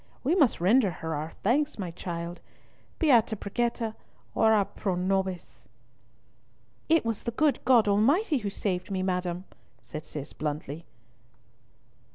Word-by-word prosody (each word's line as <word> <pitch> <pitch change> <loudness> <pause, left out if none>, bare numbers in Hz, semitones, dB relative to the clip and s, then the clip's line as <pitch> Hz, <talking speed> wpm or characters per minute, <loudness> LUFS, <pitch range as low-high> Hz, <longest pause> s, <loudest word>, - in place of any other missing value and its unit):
We 285 +6 +2
must 300 -10 +3
render 205 +5 +4
her 160 -1 -5
our 155 +2 -4
thanks, 285 +8 +2
my 185 -5 -4
child. 170 0 -6 0.6
Beata 240 -8 +4
Brigitta, 225 +2 -2 0.4
ora 220 -2 +4
pro 190 -2 -3
nobis." 190 0 -2 1.2
"It 325 -5 +4
was 225 -2 -1
the - - -3
good 290 +5 +1
God 240 -4 +5
Almighty 275 - +3
who 205 -3 -3
saved 185 -2 -3
me, 190 -1 -1
madam," 180 -1 -2 0.4
said 155 - -7
Cis 145 -2 -6
bluntly. 150 +1 -4
200 Hz, 130 wpm, -28 LUFS, 175-240 Hz, 1.2 s, God